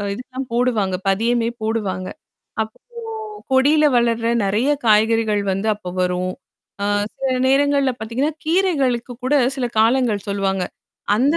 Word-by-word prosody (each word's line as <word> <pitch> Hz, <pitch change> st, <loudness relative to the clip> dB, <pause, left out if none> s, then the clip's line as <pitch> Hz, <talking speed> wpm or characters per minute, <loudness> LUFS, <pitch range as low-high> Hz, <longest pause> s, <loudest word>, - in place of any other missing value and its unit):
அ -, -, -3 dB
இதுக்கெல்லாம் 255 Hz, +4 st, -6 dB
போடுவாங்க. 230 Hz, -6 st, +1 dB
பதியமே 230 Hz, +4 st, +1 dB
போடுவாங்க. 200 Hz, -5 st, -2 dB, 0.5 s
அப்போ 220 Hz, 0 st, -9 dB, 0.7 s
கொடியில 290 Hz, +4 st, +4 dB
வளர்ற 235 Hz, -1 st, +1 dB, 0.2 s
நெறைய 215 Hz, +8 st, +1 dB, 0.2 s
காய்கறிகள் 215 Hz, -1 st, +3 dB
வந்து 195 Hz, +3 st, -1 dB
அப்போ 185 Hz, -3 st, -8 dB
வரும். 180 Hz, 0 st, -1 dB, 0.5 s
ஆ -, -, 0 dB, 0.3 s
சில 260 Hz, -1 st, -1 dB
நேரங்கள்ல 280 Hz, -1 st, +3 dB
பாத்தீங்கன்னா, 245 Hz, +8 st, -1 dB
கீரைகளுக்கு 290 Hz, -9 st, +1 dB
கூட 265 Hz, +3 st, +2 dB, 0.2 s
சில 255 Hz, -, -1 dB
காலங்கள் 225 Hz, -3 st, +2 dB
சொல்வாங்க. 195 Hz, -2 st, 0 dB, 0.5 s
அந்த 280 Hz, +8 st, +3 dB
230 Hz, 120 wpm, -20 LUFS, 205-265 Hz, 0.7 s, கொடியில